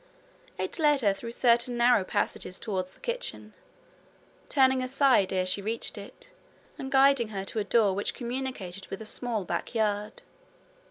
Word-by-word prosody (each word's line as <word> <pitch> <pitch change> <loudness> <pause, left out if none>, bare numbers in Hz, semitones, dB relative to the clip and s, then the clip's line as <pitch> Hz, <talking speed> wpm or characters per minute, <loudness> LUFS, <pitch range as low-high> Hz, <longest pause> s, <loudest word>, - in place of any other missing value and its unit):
It - - -3
led 295 -3 +4
her 205 -4 +3
through 230 +4 -7
certain 240 0 +3
narrow 240 -3 +4
passages 185 0 -2
towards 185 -5 -4
the - - -24
kitchen, - - -4 1.0
turning 265 -2 +4
aside 255 -6 +3
ere 185 -1 +1
she 185 +2 0
reached 225 +3 -3
it, - - -10 0.5
and 265 0 -5
guiding 270 -3 +5
her 195 -3 -5
to 220 - -4
a - - 0
door 210 -3 +3
which 200 +2 -2
communicated 240 -7 -5
with 195 - -6
a 220 - -8
small 225 -1 -2
back 235 - -4
yard. 210 -1 -1
230 Hz, 160 wpm, -28 LUFS, 200-260 Hz, 1.0 s, guiding